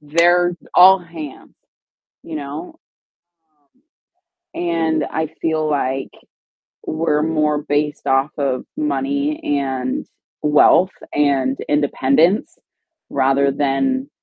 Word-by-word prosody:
they're 175 +4 +3 0.2
all 190 +2 +8
hands, 165 -5 -10 0.7
you 160 - -7
know? 150 +4 -7 1.8
Um, - - -3
And 160 -3 0
I 160 0 -1
feel 155 -1 0
like 135 -2 -2 0.7
we're 155 -1 0
more 155 -1 +1
based 145 +1 -2
off 135 +2 +2
of 135 -3 -1
money 290 0 -1 0.2
and 130 -2 -3 0.4
wealth 150 +5 +4 0.2
and 135 -2 +1
independence 150 - +1 0.5
rather 140 0 +2
than 260 - -1
150 Hz, 95 wpm, -19 LUFS, 140-170 Hz, 1.8 s, all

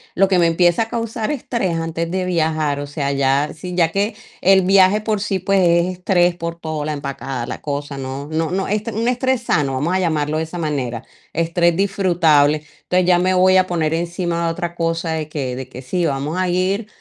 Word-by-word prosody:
lo 195 +1 +4
que 185 -2 +2
me 170 - +4
empieza 175 +4 +3
a 225 - -9
causar 230 +1 -3
estrés, 230 - -2
antes 165 0 -3
de 185 0 -1
viajar. 155 -4 0
O 145 - -4
sea, 140 -1 -2
ya 140 +1 +1
si 180 +3 -7
ya 165 -2 +2
que 205 +3 -1 0.3
el 190 +1 +5
viaje 195 +2 +4
por 215 -1 -1
sí, 195 -2 -1
pues, 195 -1 +1
es 170 0 +3
estrés 180 -1 +2
por 170 0 -5
todo, 155 -2 -4
la 155 - -2
empacada, 135 -3 -5
la - - -5
cosa, 145 -1 -4
¿no? 135 +2 -5
No 160 +1 -1
no 190 +1 -1
es 210 +1 -1
un 225 +2 -1
estrés 255 0 +1
sano, 145 - 0
vamos 150 +7 -1
a 185 - +2
llamarlo 155 -4 0
de 160 - 0
esa 160 +2 -7
manera, 130 -7 -2 0.3
estrés 170 +1 +1
disfrutable. 170 -7 +3 0.3
Entonces, 180 0 +1
ya 180 - +5
me 185 +1 +2
voy 185 +1 +5
a 185 - +4
poner 165 -3 0
encima, 170 0 -1
otra 170 +1 -4
cosa 165 0 -1
de 155 -1 -3
que 135 -5 -4
de 130 0 -6
que 130 - -9
sí 170 +7 -1
vamos 145 +2 -2
a 185 0 +1
ir 190 +4 0
170 Hz, 215 wpm, -19 LUFS, 150-185 Hz, 0.3 s, el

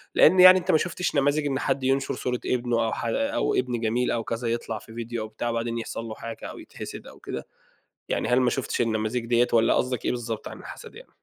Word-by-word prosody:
لإن 185 +4 +6
يعني 185 +1 +10
أنت 185 +1 0
ما 160 - +5
شُفتش 175 +1 -2
نماذج 145 +2 +2
إن 135 -1 -1
حد 135 - -1
ينشر 135 +1 +1
صورة 125 -1 -2
ابنه، 120 -2 +1
أو 110 - -1
ح - - -4
أو 280 - 0
ابن 125 -2 0
جميل 120 +3 +1
أو 115 -1 -1
كذا 115 +1 -3
يطلع 115 -1 -2
في 110 - -14
فيديو 115 -1 -4
أو - - -5
بتاع 120 +2 -3
وبعدين 115 0 -2
يحصل 115 0 -5
له 110 -1 -6
حاجة 115 -1 -8
أو - - -7
يتحسد - - -9
أو - - -13
كده، - - -6 0.6
يعني - - 0
هل 125 +1 +4
ما 125 - +3
شُفتش 125 0 -1
النماذج 115 +1 -1
دِيّة، 120 +1 +3
والّا 115 0 +4
قصدك 125 -2 -1
إيه - - +2
بالضبط 115 -3 -4
عن - - -9
الحسد - - -10
يعني؟ - - -14
120 Hz, 235 wpm, -26 LUFS, 115-135 Hz, 0.6 s, يعني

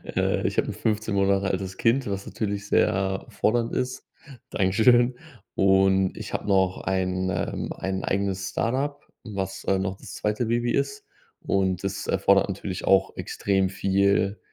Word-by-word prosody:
Äh, - - +1
ich - - -4
hab - - +3
'n - - -3
15 110 -1 -1
Monate 100 0 +2
altes 95 0 -3
Kind, 120 +1 +2
was 100 0 -3
natürlich 100 -2 -3
sehr 95 -2 +1
fordernd 115 +1 0
ist. 130 0 -3 0.5
Dankeschön. 120 +6 +4 0.4
Und 95 -1 +3
ich - - -7
habe - - -3
noch 95 -2 +2
ein 95 -1 -1
ähm, - - -3
ein 95 0 -3
eigenes 95 -1 -1
Start-up, 135 +8 -2 0.2
was, 95 -3 -5
äh, 95 - +2
noch 95 0 -2
das - - -10
2. 105 +3 -1
Baby 120 +1 +1
ist. 415 0 -1 0.4
Und 95 -1 0
das 95 0 -3
erfordert 100 +1 +3
natürlich 95 -1 -5
auch 95 0 +3
extrem 95 -2 0
viel, 100 +1 +1
100 Hz, 155 wpm, -25 LUFS, 95-110 Hz, 0.5 s, Dankeschön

